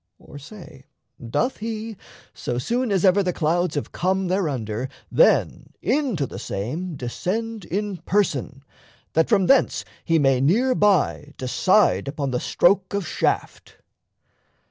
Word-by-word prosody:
Or, 145 Hz, -, -12 dB
say, 145 Hz, -4 st, -13 dB, 0.4 s
doth 250 Hz, -, 0 dB
he, 220 Hz, 0 st, -5 dB, 0.4 s
so 120 Hz, -, -4 dB
soon 235 Hz, -, -1 dB
as 195 Hz, -1 st, +2 dB
ever 190 Hz, +2 st, +5 dB
the 185 Hz, -2 st, 0 dB
clouds 175 Hz, +1 st, 0 dB
Have 145 Hz, -, -3 dB
come 190 Hz, +1 st, 0 dB
thereunder, 130 Hz, -, -2 dB, 0.2 s
then -, -, +2 dB
into 255 Hz, -, 0 dB
the -, -, -8 dB
same 155 Hz, -, -4 dB
Descend 205 Hz, -, -4 dB
in 200 Hz, 0 st, -3 dB
person, 150 Hz, -7 st, -1 dB, 0.5 s
that 160 Hz, 0 st, +2 dB
from 200 Hz, -5 st, +3 dB
thence 275 Hz, -, +3 dB, 0.2 s
he 165 Hz, -1 st, +2 dB
may 135 Hz, -4 st, +3 dB
Near 230 Hz, -, +3 dB
by 190 Hz, -, +1 dB
decide 185 Hz, +9 st, +2 dB
upon 140 Hz, -1 st, -3 dB
the 125 Hz, -, 0 dB
stroke 190 Hz, +6 st, +2 dB
of 200 Hz, -5 st, -2 dB
shaft? -, -, -2 dB
180 Hz, 135 wpm, -23 LUFS, 140-210 Hz, 0.5 s, ever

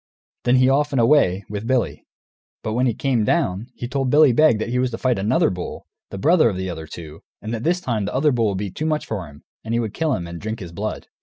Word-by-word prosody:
Then 125 Hz, -, +4 dB
he 130 Hz, 0 st, +5 dB
off 145 Hz, +2 st, +2 dB
and 135 Hz, -, +2 dB
away, 115 Hz, -7 st, +3 dB
with 105 Hz, +2 st, -5 dB
Billy. 130 Hz, -1 st, -1 dB, 0.6 s
But 110 Hz, -, -2 dB
when 125 Hz, +3 st, +2 dB
he 115 Hz, -, 0 dB
came 130 Hz, -5 st, +1 dB
down, 105 Hz, -, 0 dB
he 120 Hz, -, -5 dB
told 135 Hz, +1 st, -1 dB
Billy 150 Hz, 0 st, +6 dB
Beg 135 Hz, -1 st, +4 dB
that 110 Hz, +2 st, -3 dB
he 125 Hz, +1 st, 0 dB
was 130 Hz, 0 st, +1 dB
to 115 Hz, -, -5 dB
fight 125 Hz, -4 st, 0 dB
another 125 Hz, -, +2 dB
bull, 90 Hz, -1 st, -6 dB, 0.2 s
the -, -, -7 dB
brother 155 Hz, -, +4 dB
of 95 Hz, -, -4 dB
the 95 Hz, -1 st, -3 dB
other 80 Hz, -2 st, -7 dB
two, 80 Hz, 0 st, -10 dB, 0.2 s
and 110 Hz, -, -5 dB
that 115 Hz, 0 st, -4 dB
this 175 Hz, +4 st, +1 dB
time 110 Hz, -, -1 dB
the 105 Hz, -, -4 dB
other 145 Hz, +3 st, +3 dB
bull 115 Hz, -4 st, +1 dB
would 100 Hz, -, -2 dB
be 100 Hz, -1 st, -4 dB
too 155 Hz, +11 st, -3 dB
much 155 Hz, -1 st, -1 dB
for 95 Hz, -7 st, -4 dB
him, 75 Hz, 0 st, -16 dB, 0.2 s
and 115 Hz, +1 st, -1 dB
would 110 Hz, -4 st, -3 dB
kill 160 Hz, -4 st, 0 dB
him 85 Hz, -, -4 dB
and 85 Hz, 0 st, -8 dB
drink 110 Hz, +2 st, -4 dB
his 90 Hz, -5 st, -8 dB
blood. 105 Hz, +5 st, -4 dB
115 Hz, 265 wpm, -22 LUFS, 100-135 Hz, 0.6 s, Billy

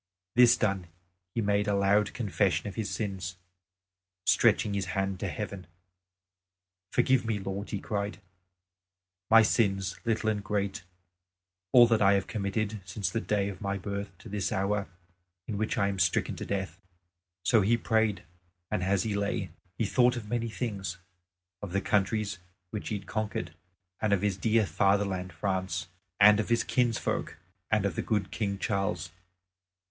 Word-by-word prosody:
This 125 Hz, 0 st, +7 dB
done, 100 Hz, -4 st, 0 dB, 0.5 s
he 115 Hz, -, +1 dB
made 100 Hz, 0 st, +1 dB
a 100 Hz, -, +2 dB
loud 100 Hz, +1 st, +2 dB
confession 100 Hz, -4 st, 0 dB
of 100 Hz, -, -5 dB
his 110 Hz, -2 st, -3 dB
sins, 95 Hz, -4 st, -4 dB, 0.9 s
stretching 105 Hz, -, +4 dB
his 100 Hz, -1 st, -1 dB
hand 95 Hz, -1 st, -1 dB
to -, -, -2 dB
heaven, 100 Hz, -4 st, -5 dB, 1.2 s
"Forgive 130 Hz, +1 st, +3 dB
me, 110 Hz, -2 st, -1 dB
Lord," 95 Hz, +1 st, -5 dB
he 100 Hz, -, -2 dB
cried, 100 Hz, +1 st, -3 dB, 1.1 s
"my 115 Hz, 0 st, +8 dB
sins, 95 Hz, -4 st, +1 dB
little 110 Hz, -1 st, +1 dB
and 105 Hz, -1 st, -3 dB
great, 100 Hz, -2 st, -2 dB, 0.9 s
all 120 Hz, -1 st, +9 dB
that 115 Hz, -2 st, +2 dB
I 100 Hz, 0 st, +6 dB
have 100 Hz, -1 st, +1 dB
committed 105 Hz, 0 st, -2 dB
since 95 Hz, +1 st, -3 dB
the 115 Hz, -, -1 dB
day 100 Hz, -3 st, 0 dB
of 95 Hz, -3 st, -6 dB
my 100 Hz, -1 st, -1 dB
birth 100 Hz, +1 st, -4 dB
to 115 Hz, -, -13 dB
this 100 Hz, -2 st, -2 dB
hour 100 Hz, +1 st, 0 dB, 0.6 s
in 105 Hz, -3 st, -4 dB
which 110 Hz, +4 st, -1 dB
I 100 Hz, -3 st, +3 dB
am 100 Hz, -1 st, -2 dB
stricken -, -, +1 dB
to -, -, -6 dB
death." 95 Hz, -3 st, -3 dB, 0.7 s
So 115 Hz, -, +5 dB
he 110 Hz, +5 st, +3 dB
prayed; 110 Hz, -2 st, +1 dB, 0.5 s
and, -, -, 0 dB
as 95 Hz, 0 st, +1 dB
he 110 Hz, -, -1 dB
lay, 100 Hz, 0 st, -1 dB, 0.3 s
he 115 Hz, -, +1 dB
thought 125 Hz, +3 st, +3 dB
of 110 Hz, -3 st, -6 dB
many 115 Hz, +1 st, -1 dB
things, 100 Hz, -7 st, -4 dB, 0.6 s
of 100 Hz, -3 st, -6 dB
the 100 Hz, -, +2 dB
countries 105 Hz, 0 st, 0 dB, 0.3 s
which 105 Hz, -, -4 dB
he 105 Hz, -, -1 dB
had 100 Hz, -, -11 dB
conquered, 110 Hz, +1 st, -3 dB, 0.5 s
and 105 Hz, -2 st, +2 dB
of 100 Hz, -1 st, +1 dB
his 100 Hz, -2 st, +1 dB
dear 110 Hz, +3 st, +2 dB
fatherland 100 Hz, -2 st, +1 dB
France, 90 Hz, 0 st, -2 dB, 0.3 s
and 105 Hz, +1 st, +8 dB
of 110 Hz, -, -1 dB
his 115 Hz, -1 st, +3 dB
kinsfolk, 120 Hz, -9 st, 0 dB, 0.3 s
and 105 Hz, -2 st, +2 dB
of 95 Hz, -5 st, -1 dB
the -, -, -1 dB
good 105 Hz, -3 st, -1 dB
King 100 Hz, -3 st, -2 dB
Charles. 95 Hz, -5 st, -1 dB
100 Hz, 165 wpm, -29 LUFS, 95-110 Hz, 1.2 s, all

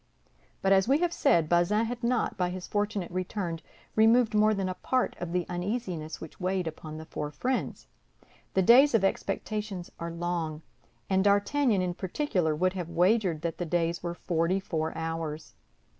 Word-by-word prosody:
But, 195 Hz, -, +3 dB
as 190 Hz, +1 st, +4 dB
we 275 Hz, +3 st, +4 dB
have 345 Hz, +1 st, 0 dB
said, 170 Hz, -, +3 dB
Bazin 175 Hz, +7 st, +3 dB
had 240 Hz, +1 st, -5 dB
not, 240 Hz, 0 st, +1 dB
by 180 Hz, -1 st, 0 dB
his 180 Hz, 0 st, -6 dB
fortunate 205 Hz, -3 st, -2 dB
return, 180 Hz, -2 st, -3 dB, 0.4 s
removed 225 Hz, +1 st, +5 dB
more 215 Hz, 0 st, +4 dB
than 195 Hz, -1 st, -1 dB
a 185 Hz, -, -2 dB
part 255 Hz, +7 st, -1 dB
of 175 Hz, -1 st, -4 dB
the 180 Hz, -1 st, 0 dB
uneasiness 175 Hz, -4 st, -3 dB
which 160 Hz, -, -10 dB
weighed 185 Hz, 0 st, -1 dB
upon 155 Hz, -1 st, -7 dB
the 160 Hz, -, -8 dB
four 150 Hz, -2 st, -4 dB
friends. 255 Hz, -, -2 dB, 0.7 s
The 190 Hz, -, +4 dB
days 250 Hz, +6 st, +7 dB
of 215 Hz, -, +3 dB
expectation 205 Hz, -1 st, -2 dB
are 170 Hz, -, -4 dB
long, 170 Hz, -2 st, -3 dB, 0.4 s
and 190 Hz, 0 st, +2 dB
D'Artagnan, 205 Hz, +2 st, +3 dB
in 180 Hz, -1 st, -1 dB
particular, 180 Hz, -, -1 dB
would 185 Hz, +4 st, +1 dB
have 175 Hz, -3 st, -4 dB
wagered 175 Hz, -1 st, +2 dB
that 170 Hz, -1 st, -3 dB
the 175 Hz, -, -1 dB
days 170 Hz, 0 st, 0 dB
were 175 Hz, 0 st, -4 dB
forty 175 Hz, +2 st, 0 dB
four 160 Hz, -4 st, -2 dB
hours. 160 Hz, -1 st, -4 dB
185 Hz, 175 wpm, -28 LUFS, 170-210 Hz, 0.7 s, days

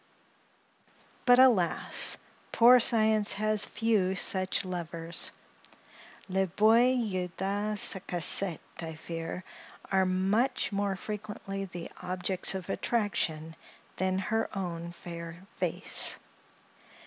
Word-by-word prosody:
But, 245 Hz, 0 st, +6 dB
alas! 235 Hz, -10 st, +3 dB, 0.3 s
poor 245 Hz, +2 st, +7 dB
Science 220 Hz, -3 st, +4 dB
has 215 Hz, 0 st, +1 dB
few 210 Hz, -4 st, 0 dB
such 190 Hz, 0 st, +1 dB
lovers! 170 Hz, -2 st, -2 dB, 1.0 s
Les 190 Hz, 0 st, 0 dB
beaux 210 Hz, +5 st, +3 dB, 0.3 s
yeux 185 Hz, -3 st, -3 dB
de 205 Hz, +2 st, -2 dB
sa 190 Hz, -, +1 dB
cassette, 175 Hz, +1 st, +1 dB, 0.2 s
I 160 Hz, -1 st, -6 dB
fear, 165 Hz, +2 st, -6 dB, 0.5 s
are 190 Hz, -1 st, +3 dB
much 195 Hz, +9 st, 0 dB
more 200 Hz, -1 st, -1 dB
frequently 200 Hz, -1 st, -6 dB
the 175 Hz, -2 st, -8 dB
objects 185 Hz, +1 st, 0 dB
of 185 Hz, -3 st, -6 dB
attraction 165 Hz, -8 st, -2 dB, 0.4 s
than 185 Hz, 0 st, 0 dB
her 220 Hz, +3 st, -1 dB
own 170 Hz, -2 st, -5 dB
fair 170 Hz, 0 st, -9 dB
face. -, -, +2 dB
190 Hz, 100 wpm, -29 LUFS, 175-210 Hz, 1.0 s, poor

